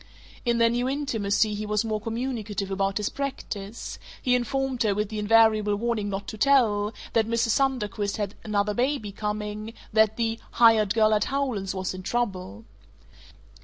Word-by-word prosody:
In 235 Hz, -1 st, +2 dB
their 230 Hz, 0 st, +4 dB
new 245 Hz, +2 st, 0 dB
intimacy 220 Hz, -7 st, 0 dB
he 210 Hz, +1 st, -4 dB
was 210 Hz, +1 st, 0 dB
more 215 Hz, -1 st, -2 dB
communicative 225 Hz, -4 st, -3 dB
about 195 Hz, 0 st, 0 dB
his 210 Hz, -1 st, -1 dB
practise; 235 Hz, -6 st, -5 dB, 0.2 s
he 250 Hz, -, +1 dB
informed 255 Hz, +1 st, 0 dB
her, 210 Hz, -3 st, +2 dB
with 210 Hz, 0 st, -1 dB
the 215 Hz, -1 st, -4 dB
invariable 215 Hz, -1 st, +4 dB
warning 220 Hz, -1 st, -1 dB
not 195 Hz, 0 st, -4 dB
to 215 Hz, -, -8 dB
tell, 215 Hz, -6 st, +3 dB, 0.2 s
that 220 Hz, -1 st, +2 dB
Mrs. 230 Hz, 0 st, +1 dB
Sunderquist 215 Hz, -6 st, 0 dB
had 205 Hz, -2 st, -2 dB
another 210 Hz, -1 st, 0 dB
baby 245 Hz, -2 st, -1 dB
coming, 210 Hz, +1 st, -4 dB, 0.2 s
that 220 Hz, 0 st, +4 dB
the 225 Hz, -1 st, -1 dB
"hired 225 Hz, -3 st, +5 dB
girl 215 Hz, -1 st, +4 dB
at 210 Hz, -1 st, +2 dB
Howland's 250 Hz, -9 st, -2 dB
was 185 Hz, -1 st, -2 dB
in 185 Hz, -, -7 dB
trouble." 185 Hz, -, -3 dB
215 Hz, 165 wpm, -26 LUFS, 205-235 Hz, 0.2 s, hired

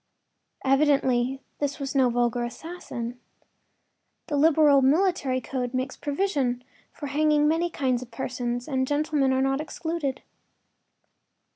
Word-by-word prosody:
Evidently 270 Hz, -2 st, +2 dB, 0.2 s
this 285 Hz, -1 st, -1 dB
was 275 Hz, -1 st, -3 dB
no 265 Hz, -3 st, +4 dB
vulgar 240 Hz, 0 st, 0 dB
assassin. 245 Hz, -2 st, -6 dB, 1.1 s
The 295 Hz, -, 0 dB
liberal 295 Hz, -1 st, +5 dB
military 280 Hz, -2 st, +2 dB
code 250 Hz, 0 st, -4 dB
makes 260 Hz, +1 st, -2 dB
provision 280 Hz, -6 st, -1 dB, 0.3 s
for 290 Hz, -, -8 dB
hanging 300 Hz, +1 st, +2 dB
many 330 Hz, +3 st, +1 dB
kinds 255 Hz, -6 st, 0 dB
of 250 Hz, -, -9 dB
persons, 245 Hz, +1 st, -3 dB
and 260 Hz, -3 st, 0 dB
gentlemen 290 Hz, -2 st, +1 dB
are 260 Hz, 0 st, +2 dB
not 270 Hz, +1 st, +1 dB
excluded. 315 Hz, -3 st, -4 dB
270 Hz, 120 wpm, -26 LUFS, 250-300 Hz, 1.1 s, liberal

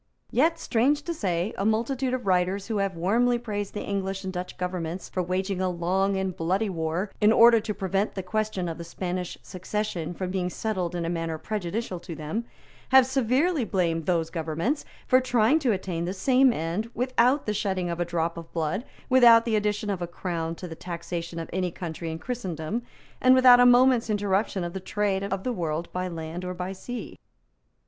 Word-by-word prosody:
Yet, 325 Hz, +6 st, +3 dB
strange 285 Hz, +2 st, +1 dB
to 340 Hz, -, -3 dB
say, 190 Hz, -, -1 dB
a -, -, 0 dB
multitude 250 Hz, +4 st, 0 dB
of 245 Hz, -4 st, -6 dB
writers 185 Hz, +1 st, +1 dB
who 220 Hz, -2 st, -2 dB
have 195 Hz, -2 st, -1 dB
warmly 235 Hz, +8 st, +2 dB
praised 205 Hz, -4 st, -4 dB
the 205 Hz, -, -3 dB
English 195 Hz, -1 st, -3 dB
and 190 Hz, 0 st, -4 dB
Dutch 180 Hz, 0 st, -5 dB
governments 180 Hz, -1 st, -4 dB
for 185 Hz, -, -2 dB
waging 185 Hz, +2 st, -1 dB
a 185 Hz, -, +1 dB
long 190 Hz, +3 st, 0 dB
and 190 Hz, -2 st, -2 dB
bloody 190 Hz, +6 st, 0 dB
war 170 Hz, +3 st, -2 dB
in 210 Hz, +1 st, +6 dB
order 230 Hz, 0 st, +7 dB
to 215 Hz, 0 st, -3 dB
prevent 195 Hz, +1 st, -1 dB
the 190 Hz, -, -3 dB
question 215 Hz, -1 st, -2 dB
of 165 Hz, 0 st, -5 dB
the -, -, -5 dB
Spanish 180 Hz, +1 st, -4 dB
succession 185 Hz, -2 st, -4 dB
from 185 Hz, 0 st, -3 dB
being 180 Hz, -1 st, -1 dB
settled 180 Hz, -4 st, -2 dB
in 170 Hz, -1 st, -2 dB
a -, -, -1 dB
manner 165 Hz, -2 st, -2 dB
prejudicial 200 Hz, +1 st, -3 dB
to 170 Hz, -1 st, -8 dB
them, 160 Hz, +10 st, -4 dB, 0.4 s
have 265 Hz, -1 st, +7 dB
severely 265 Hz, +5 st, +1 dB
blamed 170 Hz, -6 st, 0 dB
those 165 Hz, -3 st, +1 dB
governments 165 Hz, -, -2 dB, 0.2 s
for 255 Hz, 0 st, +5 dB
trying 250 Hz, +3 st, +3 dB
to 265 Hz, -6 st, +1 dB
attain 185 Hz, -4 st, -2 dB
the 185 Hz, +2 st, -3 dB
same 260 Hz, +6 st, +4 dB
end 175 Hz, +4 st, -2 dB
without 255 Hz, +2 st, +2 dB
the 210 Hz, -, 0 dB
shedding 190 Hz, -3 st, -1 dB
of 170 Hz, -, -4 dB
a -, -, +2 dB
drop 170 Hz, -1 st, -2 dB
of 165 Hz, -1 st, -9 dB
blood, 165 Hz, +6 st, -1 dB, 0.2 s
without 235 Hz, -3 st, +7 dB
the 225 Hz, -2 st, +1 dB
addition 210 Hz, 0 st, 0 dB
of 190 Hz, -3 st, -3 dB
a 175 Hz, -, -2 dB
crown 170 Hz, -2 st, -3 dB
to 180 Hz, -, -7 dB
the 165 Hz, -, -7 dB
taxation 170 Hz, 0 st, -5 dB
of 165 Hz, -, -4 dB
any 180 Hz, 0 st, 0 dB
country 165 Hz, -1 st, -6 dB
in 160 Hz, -, -4 dB
Christendom, 185 Hz, -1 st, -4 dB, 0.4 s
and 255 Hz, 0 st, +7 dB
without 255 Hz, -1 st, +8 dB
a 245 Hz, -, +7 dB
moment's 245 Hz, -1 st, +5 dB
interruption 205 Hz, -2 st, 0 dB
of 175 Hz, 0 st, -4 dB
the 190 Hz, -, -4 dB
trade 195 Hz, 0 st, -1 dB
of 195 Hz, -1 st, -3 dB
the 250 Hz, -, -1 dB
world 165 Hz, -3 st, -3 dB
by 185 Hz, 0 st, -2 dB
land 165 Hz, 0 st, -6 dB
or 180 Hz, 0 st, -4 dB
by 180 Hz, +1 st, -4 dB
sea. 230 Hz, +4 st, -7 dB
190 Hz, 200 wpm, -26 LUFS, 175-225 Hz, 0.4 s, without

